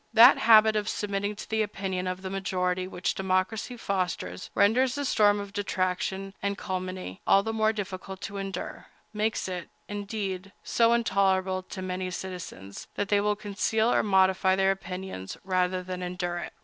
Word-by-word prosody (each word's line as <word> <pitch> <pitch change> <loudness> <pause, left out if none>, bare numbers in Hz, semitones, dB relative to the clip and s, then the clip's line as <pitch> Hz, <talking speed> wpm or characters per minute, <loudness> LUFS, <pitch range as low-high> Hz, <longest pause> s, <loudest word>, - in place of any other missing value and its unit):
That 240 +4 +9
habit 220 -1 +7
of 210 0 0
submitting 205 0 -2
to - - -8
the 220 0 0
opinion 190 -3 -2
of 185 +1 -4
the 190 - -4
majority 185 -1 -1
which 180 0 -2
democracy 195 +6 -1
fosters 180 - -3
renders 245 +5 +4
the 285 0 -2
storm 205 -4 +4
of 200 -1 -7
detraction 190 0 -1
and 200 0 -1
calumny 185 - -5
all 195 - +6
the 225 +1 -2
more 220 0 +3
difficult 190 -2 -6
to 205 -1 -5
endure—makes 200 +3 -4
it, 180 -2 -5 0.2
indeed, 200 -2 -4
so 230 0 +3
intolerable 190 -4 +2
to 185 0 -8
many 185 0 -3
citizens, 180 - -7
that 205 -1 -2
they 205 -1 +4
will 210 0 +1
conceal 215 +3 0
or - - +4
modify 190 -1 +3
their 195 0 +3
opinions 185 - -6
rather 185 -1 0
than 185 0 -5
endure 180 -1 -3
it. - - -7
195 Hz, 160 wpm, -28 LUFS, 185-210 Hz, 0.2 s, That